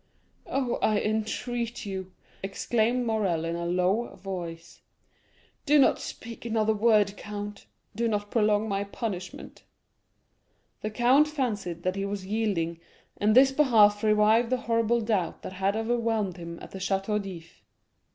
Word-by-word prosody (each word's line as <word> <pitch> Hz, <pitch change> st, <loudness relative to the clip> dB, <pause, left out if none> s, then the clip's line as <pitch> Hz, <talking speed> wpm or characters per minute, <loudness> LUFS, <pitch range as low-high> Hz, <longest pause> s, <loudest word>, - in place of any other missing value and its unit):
"Oh, 260 Hz, -3 st, -1 dB
I 215 Hz, -1 st, +3 dB
entreat 230 Hz, +3 st, -2 dB
you," 190 Hz, -2 st, -5 dB, 0.3 s
exclaimed 235 Hz, +5 st, 0 dB
Morrel 195 Hz, -8 st, 0 dB
in 165 Hz, 0 st, -2 dB
a 170 Hz, 0 st, -3 dB
low 185 Hz, +6 st, 0 dB
voice, 170 Hz, -3 st, -7 dB, 0.9 s
"do 295 Hz, +1 st, +6 dB
not 275 Hz, -, +4 dB
speak 230 Hz, 0 st, -8 dB
another 220 Hz, -1 st, +1 dB
word, 210 Hz, -2 st, +3 dB
count; 205 Hz, -1 st, -7 dB, 0.3 s
do 235 Hz, +2 st, 0 dB
not 205 Hz, -2 st, -2 dB
prolong 215 Hz, -1 st, +2 dB
my 200 Hz, -1 st, -1 dB
punishment." 200 Hz, -3 st, -6 dB, 1.2 s
The 215 Hz, -, -2 dB
count 250 Hz, +7 st, +4 dB
fancied 210 Hz, -, -3 dB
that 185 Hz, +1 st, 0 dB
he 195 Hz, 0 st, -2 dB
was 200 Hz, -1 st, -4 dB
yielding, 190 Hz, -6 st, -1 dB, 0.4 s
and 215 Hz, +1 st, +2 dB
this 265 Hz, +1 st, +7 dB
belief 220 Hz, -8 st, +4 dB
revived 215 Hz, +2 st, +4 dB
the 255 Hz, -1 st, 0 dB
horrible 230 Hz, 0 st, +1 dB
doubt 215 Hz, -6 st, -1 dB
that -, -, -6 dB
had 195 Hz, +2 st, 0 dB
overwhelmed 225 Hz, -4 st, 0 dB
him 170 Hz, -1 st, -7 dB
at -, -, -10 dB
the 190 Hz, -, -7 dB
Château 195 Hz, +2 st, 0 dB
d'If. 175 Hz, -4 st, -10 dB
210 Hz, 140 wpm, -27 LUFS, 190-230 Hz, 1.2 s, this